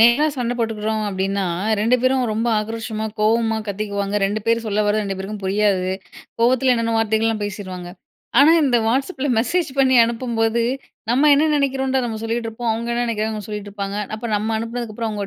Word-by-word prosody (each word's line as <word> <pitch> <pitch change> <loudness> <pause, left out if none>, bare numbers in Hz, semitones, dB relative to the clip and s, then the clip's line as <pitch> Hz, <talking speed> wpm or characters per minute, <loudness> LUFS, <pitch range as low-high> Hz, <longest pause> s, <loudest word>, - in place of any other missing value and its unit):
நேரா 240 +6 +6
சண்ட 245 -1 -1
போட்டுக்கிறோம் 220 -1 -1
அப்பிடின்னா, 195 0 -1 0.4
2 230 +4 +3
பேரும் 255 0 +3
ரொம்ப 225 +2 -1
ஆக்ரோஷமா 220 0 -4 0.2
கோவமா 225 +1 +2
கத்திக்குவாங்க. 200 0 -2
2 205 +2 -2
பேர் 230 0 +2
சொல்லவரது 210 0 +1
2 195 -1 -3
பேருக்கும் 200 +2 -6
புரியாது. 195 -2 +1 0.5
கோவத்தில 255 +2 +4
என்னன்னமோ 230 -1 0
வார்த்தைகள்லாம் 220 0 +1
பேசிருவாங்க. 185 -3 -6 0.5
ஆனா, 285 +3 +7
இந்த 255 -3 +3
வாட்ஸ்அப்ல 275 +4 0
மெசேஜ் 325 +5 0
பண்ணி 260 -1 +4
அனுப்பும்போது, 230 -1 0 0.5
நம்ம 275 +5 +4
என்ன 295 +3 +3
நினைக்கிறோன்றத 265 -1 0
நம்ம 220 -1 -4
சொல்லிட்டு 230 0 -2
இருப்போம். 225 +1 -3
அவுங்க 230 +1 -3
என்ன 240 - 0
நினைக்கிறாங்க 220 -1 -1
அவுங்க 210 -2 -6
சொல்லிட்டு 210 -1 -5
இருப்பாங்க. 200 0 -4 0.2
அப்ப 230 +2 -5
நம்ம 215 +2 -2
அனுப்பினதுக்கு 230 -1 -5
அப்புறம் 230 -1 -2
அவுங்க 205 -1 -4
225 Hz, 170 wpm, -21 LUFS, 210-240 Hz, 0.5 s, ஆனா